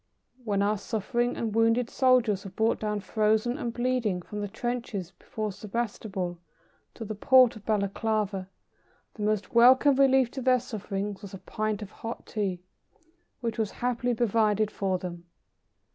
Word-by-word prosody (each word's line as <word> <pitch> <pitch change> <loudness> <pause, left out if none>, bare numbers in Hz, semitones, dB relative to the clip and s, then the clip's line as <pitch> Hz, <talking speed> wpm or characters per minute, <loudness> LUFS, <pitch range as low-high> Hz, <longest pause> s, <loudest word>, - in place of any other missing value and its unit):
When 200 -3 0
our 210 0 +1
suffering 240 +4 -1
and 225 -3 -2
wounded 230 +2 +3
soldiers 245 -7 +3
were 195 - -7
brought 220 +4 0
down 210 -1 -2
frozen 220 +3 +1
and 240 -5 -2
bleeding 240 -7 -1
from 210 +3 -6
the 205 - -2
trenches 220 -4 -4
before 210 +3 -5
Sebastopol 200 -3 -4 0.6
to 225 - -6
the 215 - -4
port 255 +3 +5
of 215 - -13
Balaklava, 205 -2 0 0.7
the 215 - -10
most 210 +3 -1
welcome 260 +4 +6
relief 265 -3 +4
to 265 - -5
their 255 0 +4
sufferings 205 -4 -5
was 200 -1 -8
a - - -7
pint 215 +2 -3
of 205 - -10
hot 230 +1 -7
Tea, 190 -4 -3 0.8
which 230 -1 -3
was 215 -2 +1
happily 245 0 -1
provided 215 -2 +2
for 190 -3 -1
them. 175 -1 -7
215 Hz, 155 wpm, -28 LUFS, 200-240 Hz, 0.8 s, welcome